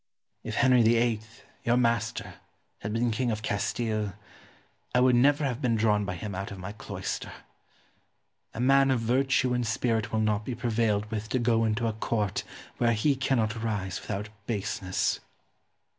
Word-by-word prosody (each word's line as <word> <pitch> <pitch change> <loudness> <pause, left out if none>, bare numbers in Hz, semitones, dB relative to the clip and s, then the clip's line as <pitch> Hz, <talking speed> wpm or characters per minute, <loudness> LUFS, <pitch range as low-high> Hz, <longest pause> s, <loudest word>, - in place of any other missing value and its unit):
Ximenes. - - -4
If - - +2
Henry 125 -2 +6
VIII., 115 -1 +3 0.4
your 120 +1 +3
master, 115 -5 0 0.5
had 105 - -4
been 115 +2 +1
King 120 +3 0
of 110 -1 -2
Castile, 105 0 -1 0.8
I - - +6
would 125 0 +5
never 145 +4 +4
have 130 0 -2
been 120 -4 +2
drawn 105 -2 +2
by 95 -2 -3
him 100 +3 -5
out 95 +2 -4
of 100 - -8
my 95 +2 -6
cloister. 105 - -5 1.2
A - - -5
man 135 +2 +5
of 130 -2 +2
virtue 130 +2 +2
and 125 - +1
spirit 115 -1 0
will 110 - +1
not 105 -1 +1
be 120 +3 -4
prevailed 110 -3 +1
with 110 0 -3
to 130 - +1
go 115 -2 +2
into 110 +2 0
a 115 - 0
Court 105 -2 -1 0.3
where 120 -1 +3
he 135 +6 +2
cannot 115 -4 0
rise 100 -5 -2
without 105 0 -4 0.2
baseness. 100 -3 -1
115 Hz, 170 wpm, -28 LUFS, 105-120 Hz, 1.2 s, Henry